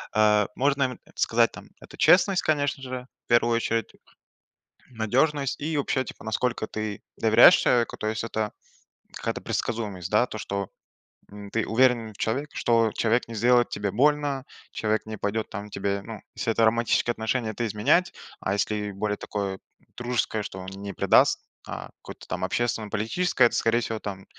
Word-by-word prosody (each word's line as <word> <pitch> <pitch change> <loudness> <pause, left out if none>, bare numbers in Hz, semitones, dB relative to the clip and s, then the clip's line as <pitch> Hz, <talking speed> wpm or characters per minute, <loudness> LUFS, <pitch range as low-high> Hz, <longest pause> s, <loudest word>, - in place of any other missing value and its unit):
Э, 105 -1 +4
можно, 140 +1 +2
м 125 -2 -2 0.2
сказать, - - +3
там, - - -12
это - - -13
честность, 185 +1 +5
конечно 145 -2 0
же, 125 -1 -6 0.2
в - - -72
первую 120 0 +4
очередь, 115 0 -1 1.0
надёжность 130 +5 0
и 155 +2 -2
вообще, 135 -2 0
типа, - - -10
насколько 115 0 -1
ты 110 -1 -5 0.2
доверяешь 110 +1 +7
человеку, 120 -1 +1
то 110 - -3
есть 110 0 -2
это 110 -2 -2 0.6
какая-то - - -3
предсказуемость, 105 -7 -3
да? 105 +3 +4
То, 110 - -7
что, 100 -1 -3 0.6
м, 100 0 -9
ты 115 - 0
уверен 115 -2 +2
в - - -19
человеке, 140 +7 -2
что 115 -2 +2
человек 115 +2 +1
не 115 - -7
сделает 120 +2 +4
тебе 100 -1 -2
больно, 140 +3 +1 0.3
человек 110 0 -1
не 110 0 -6
пойдет 105 +2 -2
там 100 +2 -6
к - - -25
тебе, 100 0 -2
ну. 110 -2 -8
Если 115 - -1
это 115 - +2
романтические 115 +1 +2
отношения, 110 0 -2
то 120 - -2
изменять, 110 - +2 0.3
а 95 - -1
если 105 0 -1
более 105 +1 -2
такое 100 -2 -4 0.4
дружеское, 120 -3 -1
что 95 -1 -7
он 95 - -8
не 100 +1 -7
предаст, - - +4 0.3
а - - -6
какое-то - - -11
там 95 0 -4
общественно-политическое, 115 - 0
это, - - -5
скорее 115 +1 +2
всего, 115 -1 -3
там, 95 -2 -7
110 Hz, 170 wpm, -26 LUFS, 105-125 Hz, 1.0 s, доверяешь